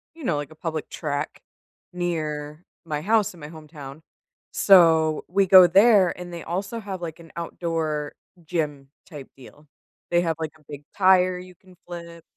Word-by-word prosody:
you 330 - -12
know, 170 - 0
like 145 -1 -5
a - - -14
public 155 -1 -5
track 145 -2 -4 0.5
near 155 -3 -4 0.2
my 150 -3 -4
house 210 +2 +1
in 170 - -15
my 150 - -9
hometown. 155 -2 -11 0.5
So, 160 -5 +5
we 195 +2 +2
go 185 -1 +8
there, 195 -1 +4
and 175 -1 -8
they 170 - -6
also 195 +7 -4
have, 195 -3 -6
like, 165 -1 -6
an 165 -1 -15
outdoor 165 -3 -3 0.3
gym-type 150 -3 -6
deal. 145 +3 -16 0.4
They 175 0 +3
have, 165 -2 -1
like, 160 -1 -4
a - - -26
big 145 -1 -9
tire 185 -1 +4
you 180 0 -13
can 185 +1 -21
flip 170 -1 -9
165 Hz, 165 wpm, -24 LUFS, 150-180 Hz, 0.5 s, go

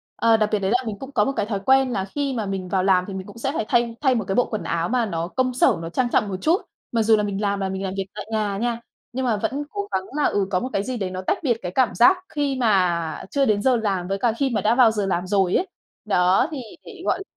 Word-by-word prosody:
Ờ, 230 -1 +4
đặc 215 -1 +1
biệt 210 - +1
đấy 195 0 -1
là 245 - +4
mình 220 -3 -3
cũng 270 +1 -8
có 210 -6 +2
một - - 0
cái 205 - 0
thói 205 -2 -2
quen 265 -1 +4
là 190 -5 -1
khi 280 +7 -3
mà 225 -4 -2
mình 195 -2 -4
vào 185 0 +1
làm 185 -1 +3
thì 200 - -6
mình 190 0 -6
cũng 205 - -12
sẽ 270 +4 -2
phải 220 - -1
thay 235 -1 +1
thay 265 -3 +3
một 225 -4 -1
cái 195 - -1
bộ 245 - +3
quần 215 - -4
áo 170 0 -1
mà 245 -1 +1
nó 170 -5 -3
công 255 +6 -1
sở, 250 - +3
nó 165 - -5
trang 245 +7 0
trọng 210 - +1
một 190 - -3
chút, 335 +5 +2 0.3
mặc 230 -2 +1
dù 220 0 +5
là 210 - 0
mình 200 -1 -3
làm 200 -1 0
là 195 -1 -1
mình 190 0 -4
làm 190 -1 -3
việc 195 - -1
tại 210 - -6
nhà 210 -2 -1
nha, 235 +2 -2 0.3
nhưng 260 +1 -2
mà 230 -4 +1
vẫn 275 +8 -2
cố 405 -1 -4
gắng 190 - 0
là, 300 - +1
ừ, 200 -2 +1
có 180 - +2
một 255 - -4
cái 200 - 0
gì 255 +3 -4
đấy 195 -4 -2
nó 185 0 -4
tách - - +2
biệt 240 -6 +1
cái 180 - -4
cảm 260 -3 +2
giác 360 +11 +6
khi 285 -2 -1
mà 180 -9 +1
chưa 280 -1 +2
đến 210 -4 +2
giờ 255 +3 +3
làm 195 -6 -1
với 195 +1 -1
cả 230 +2 +1
khi 275 0 +1
mà 235 - -1
đã 220 +2 +2
vào 245 -3 +6
giờ 210 -2 -1
làm 185 -1 -1
rồi 190 -2 +2
ấy. 375 - +1 0.4
Đó, 185 -2 +3
thì 290 -4 -4 0.2
để, 395 -6 -11
gọi 355 - +1
là, - - -6
215 Hz, 310 wpm, -23 LUFS, 195-255 Hz, 0.4 s, giác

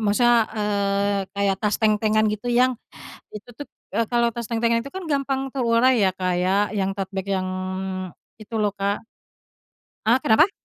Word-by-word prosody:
maksudnya, 230 +2 +3
eee, 200 -1 0 0.2
kayak 200 -1 +1
tas 210 -1 +1
tentengan 215 0 +2
gitu 215 +3 -4
yang, 250 +2 +3 0.6
itu 210 +3 -10 0.6
kalau 235 -1 +3
tas 235 -1 -6
tentengan 230 0 +1
itu 275 - -9
kan 380 0 -6
gampang 270 -1 -1
terurai 240 0 +3
ya 190 - +3
Kak 185 -1 -1
ya, 195 +3 +2
yang 195 -2 -1
tote 195 -1 -4
bag 190 0 -4
yang 190 -1 -1 0.9
itu 220 +1 -8
loh 210 -2 +1
Kak 200 +2 -2 1.0
heeh, 240 +3 +5
kenapa? 310 - +4
215 Hz, 150 wpm, -23 LUFS, 200-240 Hz, 1.0 s, heeh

